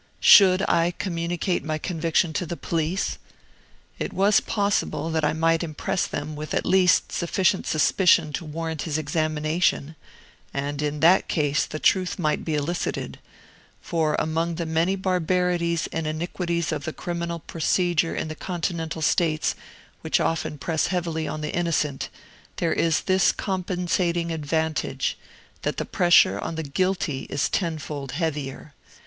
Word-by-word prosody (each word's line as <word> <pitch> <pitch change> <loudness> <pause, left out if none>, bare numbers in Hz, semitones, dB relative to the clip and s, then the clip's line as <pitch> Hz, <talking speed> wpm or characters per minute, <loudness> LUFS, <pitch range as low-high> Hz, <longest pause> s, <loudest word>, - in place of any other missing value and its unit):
Should 190 -1 +7
I 170 +1 +2
communicate 175 -1 -2
my 155 +1 -2
conviction 165 0 0
to 175 +3 -2
the 170 - -4
police? 165 +3 -2 0.8
It - - -3
was 200 +2 +4
possible 200 -5 -1
that 160 -1 0
I 150 - +3
might 165 +1 +2
impress 160 +2 -2
them 150 +1 -5
with 150 +1 -4
at - - 0
least 185 -1 +4
sufficient 185 +2 +1
suspicion 165 0 +3
to - - -3
warrant 160 0 -4
his 155 -2 -2
examination 155 0 0 0.6
and 140 +1 -2
in 150 0 -2
that 175 +4 +5
case 145 -3 +1
the 155 - -5
truth 185 +3 +2
might 155 -5 0
be 160 - -1
elicited; 155 +4 -3 0.6
for 160 -3 0
among 165 +2 -1
the 170 0 -3
many 165 +4 +1
barbarities 180 -2 0
and 160 -1 -2
iniquities 170 +1 -2
of 150 -3 -3
the 160 - -3
criminal 170 -1 -4
procedure 165 +1 0
in - - -2
Continental 165 -2 -3
States 155 -1 +2 0.5
which - - +1
often 165 -2 -1
press 160 +2 0
heavily 170 -3 -2
on 155 +1 -4
the 150 - -4
innocent, 155 -5 -1 0.5
there 170 -2 0
is 165 -2 +2
this 185 -1 +3
compensating 175 -2 -1
advantage, 155 -3 -1 0.5
that - - -2
the - - -2
pressure 175 - +4
on 165 - -4
the 160 - -3
guilty 155 -2 -1
is 145 - 0
tenfold 150 -6 -3
heavier. 150 -3 -3
165 Hz, 140 wpm, -24 LUFS, 155-175 Hz, 0.8 s, Should